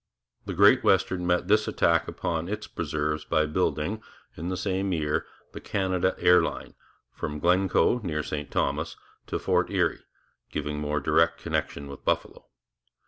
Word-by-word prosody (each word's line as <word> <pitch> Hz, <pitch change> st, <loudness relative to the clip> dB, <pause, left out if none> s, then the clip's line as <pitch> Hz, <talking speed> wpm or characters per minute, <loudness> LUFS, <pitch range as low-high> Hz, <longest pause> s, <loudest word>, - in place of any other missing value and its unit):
The -, -, -3 dB
Great -, -, +6 dB
Western 90 Hz, -2 st, +2 dB
met 90 Hz, 0 st, +1 dB
this 105 Hz, +2 st, +3 dB
attack 85 Hz, -1 st, +2 dB
upon 85 Hz, 0 st, -3 dB
its 105 Hz, +1 st, -4 dB
preserves 75 Hz, -2 st, -2 dB
by 80 Hz, -2 st, +1 dB
building 75 Hz, +6 st, -1 dB, 0.3 s
in 85 Hz, +3 st, -5 dB
the 95 Hz, -, -2 dB
same 95 Hz, +1 st, -1 dB
year 75 Hz, -2 st, -1 dB, 0.2 s
the -, -, -9 dB
Canada 95 Hz, -2 st, 0 dB
Air 90 Hz, 0 st, +6 dB
Line, 80 Hz, -, -4 dB, 0.4 s
from 75 Hz, -, -4 dB
Glencoe 90 Hz, +6 st, +3 dB
near 80 Hz, -8 st, -3 dB
St 75 Hz, -1 st, -4 dB
Thomas, 75 Hz, +3 st, -1 dB, 0.3 s
to -, -, -2 dB
Fort -, -, +1 dB
Erie, -, -, 0 dB, 0.5 s
giving 75 Hz, 0 st, -3 dB
more 75 Hz, 0 st, -1 dB
direct 85 Hz, 0 st, +2 dB
connection 70 Hz, -, -3 dB
with 70 Hz, -1 st, -10 dB
Buffalo. -, -, -2 dB
85 Hz, 150 wpm, -27 LUFS, 75-95 Hz, 0.5 s, Great